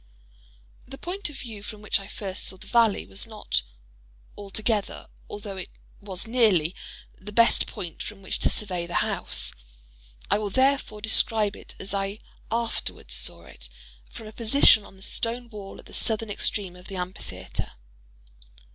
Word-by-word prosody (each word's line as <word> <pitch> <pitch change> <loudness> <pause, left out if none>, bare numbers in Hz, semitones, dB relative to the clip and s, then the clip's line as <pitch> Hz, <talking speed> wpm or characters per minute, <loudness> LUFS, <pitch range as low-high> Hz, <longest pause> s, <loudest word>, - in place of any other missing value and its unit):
The 270 +1 -8
point 370 +4 -3
of 290 - -9
view 220 -4 -7
from 210 0 -9
which 210 - +2
I 195 - -9
first 195 -2 -2
saw 190 - +2
the - - -13
valley, 230 -4 +4
was 200 +4 -4
not 215 - 0 0.7
altogether, 205 +1 -2 0.2
although 205 -1 -5
it 185 - -5 0.3
was 195 -1 -3
nearly, 215 -9 +4 0.5
the 210 +2 -8
best 230 +2 +5
point 170 -3 -6
from 195 -2 -7
which - - -2
to - - +4
survey 180 -5 -2
the 175 - -5
house. - - 0 0.8
I - - +5
will 210 -1 -1
therefore 260 -2 +2
describe 215 -1 +5
it - - -11
as 195 - -3
I 195 +1 -1 0.3
afterwards 230 0 -1
saw - - +2
it—from - - -12
a 215 - -8
position 230 -2 +6
on 195 - -14
the 190 - -12
stone 235 +3 -1
wall 200 -2 -8
at - - -13
the - - -14
southern 220 -1 0
extreme 200 -2 -1
of 180 0 -13
the 195 - -6
amphitheatre. 180 0 -5
205 Hz, 160 wpm, -27 LUFS, 190-225 Hz, 0.8 s, position